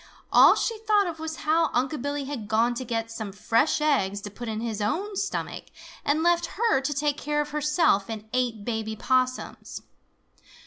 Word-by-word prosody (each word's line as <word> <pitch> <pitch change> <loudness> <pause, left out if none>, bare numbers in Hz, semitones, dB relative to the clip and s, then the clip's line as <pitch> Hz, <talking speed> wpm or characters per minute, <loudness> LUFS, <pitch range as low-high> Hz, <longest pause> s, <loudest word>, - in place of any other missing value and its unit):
All - - +8
she 455 -2 -1
thought 420 -2 +3
of 335 -3 -5
was 320 0 -4
how 320 +1 +3
Unc' 260 +3 0
Billy 285 +1 -2
had 265 -7 -5
gone 225 +3 +2
to 240 - -4
get 225 -2 -3
some 220 -3 -5
fresh 225 +10 +1
eggs 205 -10 +1
to 205 - -7
put 240 +4 -8
in 220 -1 -3
his 225 -2 -3
own 390 - -1
stomach 395 +1 -3 0.4
and 300 +3 +1
left 345 0 +3
her 445 - +2
to 275 +2 -2
take 290 0 0
care 295 +1 -1
of 295 - -2
herself 300 - +2
and 220 -1 -6
eight 240 -5 -1
baby 220 -2 -3
Possums. 255 +2 -1
265 Hz, 185 wpm, -26 LUFS, 225-315 Hz, 0.4 s, All